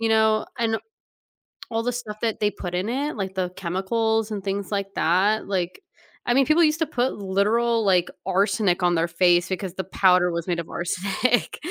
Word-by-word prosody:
you 225 - +1
know, 220 -1 +3
and 225 -1 +1 1.0
all 225 0 0
the 245 - -1
stuff 215 -3 -6
that 225 -2 -1
they 210 -1 +1
put 180 -3 -6
in 185 +3 -1
it, 285 +4 -2
like 190 -3 -4
the 185 -2 -1
chemicals 220 +5 -1
and 205 -3 -5
things 200 +1 -3
like 200 -1 -2
that, 195 +6 +2
like, 185 - -2 0.5
I 240 - +3
mean, 270 -1 +4
people 315 +3 +4
used 305 +1 +2
to 320 - +2
put 255 -3 -1
literal, 220 +4 +1
like, 180 -3 +3 0.2
arsenic 195 -1 +1
on 175 0 +3
their 165 +1 +1
face 175 +1 +3
because 185 -1 -3
the 190 - -4
powder 180 -2 +3
was 170 -1 -3
made 175 -2 -1
of 165 - -6
arsenic, 195 +8 -1
200 Hz, 195 wpm, -24 LUFS, 180-225 Hz, 1.0 s, mean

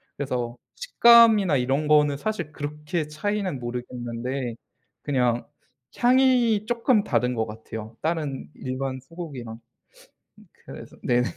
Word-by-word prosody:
그래서 125 -4 -3 0.2
식감이나 230 - +6
이런 135 +4 0
거는 150 -1 +4
사실 175 -4 -4
그렇게 150 +2 -4
차이는 185 -1 -2
모르겠는데 120 0 -4 0.5
그냥 125 -4 0 0.5
향이 245 -4 +3
쪼끔 235 -2 +2
다른 125 0 0
것 110 -1 0
같아요, 110 0 -9
다른 150 - -2
일반 130 0 -4
소고기랑. 135 -7 -8 1.1
그래서 - - -11
네. 120 0 +2
145 Hz, 255 characters per minute, -25 LUFS, 125-195 Hz, 1.1 s, 식감이나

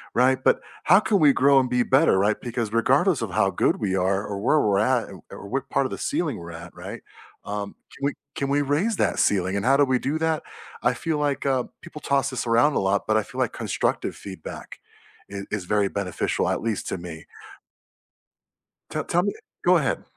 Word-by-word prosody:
right, 130 +2 +3
but - - +4 0.3
how 190 +5 +7
can 210 -2 +1
we 145 -3 +6
grow 140 +1 +5
and 125 - 0
be 125 -1 +2
better, 135 -5 +4
right, 105 +2 +2
because 115 -3 -3
regardless 135 - +3
of 110 - -2
how 95 0 +2
good - - +1
we 95 -3 -1
are 95 +2 +1
or 100 -1 -4
where 150 +8 +3
we're 100 -5 +2
at 120 +2 +2
or 95 -5 -11
or - - -9
or 100 - -9
what 135 +1 -3
part 140 - +1
of - - -3
the - - -5
ceiling 160 -5 -1
we're 85 0 -9
at, 85 +1 -10
right? - - -8 0.4
Um, 100 0 -5 0.2
can 140 - -4
we 145 - +1 0.2
can 140 0 -2
we 145 +1 +2
raise 165 +11 +1
that - - 0
ceiling, 95 -1 +2
and 100 - -2
how 135 - +5
do 145 - +5
we 130 -1 +1
do 145 +4 -1
that? 160 -1 0 0.4
I - - +2
feel 160 -2 -2
like, 145 -2 -1
uh, 130 -2 +1 0.2
people 160 -3 -10
toss 140 -1 +1
this 125 -1 -3
around 120 +6 +4
a - - +1
lot, 95 +1 +1
but 110 0 +3
I - - +3
feel 130 +4 -12
like 125 -3 0
constructive - - -2
feedback 95 -5 -9 0.5
is 100 0 -6
is 100 -4 -3
very 105 0 +1
beneficial, 95 -3 -1
at - - 0
least 110 -3 -2
to - - -3
me. 85 -2 -9 1.6
Te - - -3
tell 175 - +1
me 205 +2 -1 0.3
go 180 0 +5
ahead. 140 -6 -1
125 Hz, 225 wpm, -24 LUFS, 100-140 Hz, 1.6 s, how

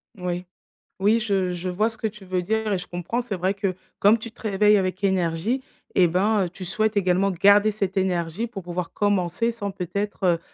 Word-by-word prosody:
Oui. 180 -1 -3 0.5
Oui 210 +4 +4
je 195 -4 0
je 180 +1 -4
vois 210 +5 +1
ce 225 - -2
que 220 - -1
tu 210 -2 -10
veux 185 -1 -1
dire 220 +3 -1
et - - +1
je 180 - -6
comprends, 175 +8 -3
c'est 230 -5 -4
vrai 185 +3 +1
que, 195 -2 -1 0.3
comme 210 +3 +5
tu 225 0 -7
te - - -20
réveilles 210 0 +4
avec 185 0 -1
énergie 190 +6 0 0.3
et 180 -2 +6
ben, 195 +3 +2
heu, - - -5
tu 185 +1 -9
souhaites 215 +3 0
également 190 0 +2
garder 200 +4 +5
cette 200 -2 -2
énergie 180 +2 0
pour 200 -5 -8
pouvoir 175 0 -4
commencer 205 +2 +1
sans 205 -3 -4
peut-être, 185 -1 -1
195 Hz, 205 wpm, -24 LUFS, 180-210 Hz, 0.5 s, et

